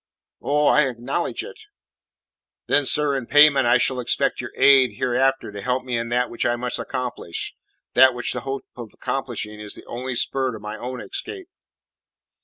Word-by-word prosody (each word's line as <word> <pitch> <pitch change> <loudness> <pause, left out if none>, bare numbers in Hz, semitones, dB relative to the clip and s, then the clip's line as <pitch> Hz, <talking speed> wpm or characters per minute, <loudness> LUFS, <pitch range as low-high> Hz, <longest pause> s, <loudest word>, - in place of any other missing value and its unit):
"Oh, 150 +1 +1
I 150 -1 +5
acknowledge 130 +6 -3
it!" 460 0 -11 1.1
"Then, 145 - +2
sir, 145 +1 +2
in 130 -3 -4
payment 145 -3 +6
I 120 +1 +5
shall 130 +1 0
expect 125 - 0
your - - -6
aid 130 -5 +5
hereafter 130 +1 0
to 100 0 -7
help 125 +2 -1
me 125 -1 -3
in 115 0 -2
that 125 +1 +1
which 120 - -4
I 120 - +1
must 125 0 -3
accomplish, 125 -9 -4 0.4
that 130 0 +6
which 120 - -1
the - - -4
hope 135 0 -5
of 120 -3 -8
accomplishing 115 -5 -3
is 105 -1 -5
the - - -12
only 125 +1 -5
spur 130 +1 0
to 110 - -7
my 105 +1 -6
own 125 +3 -6
escape." 390 -1 -5
125 Hz, 180 wpm, -22 LUFS, 120-135 Hz, 1.1 s, payment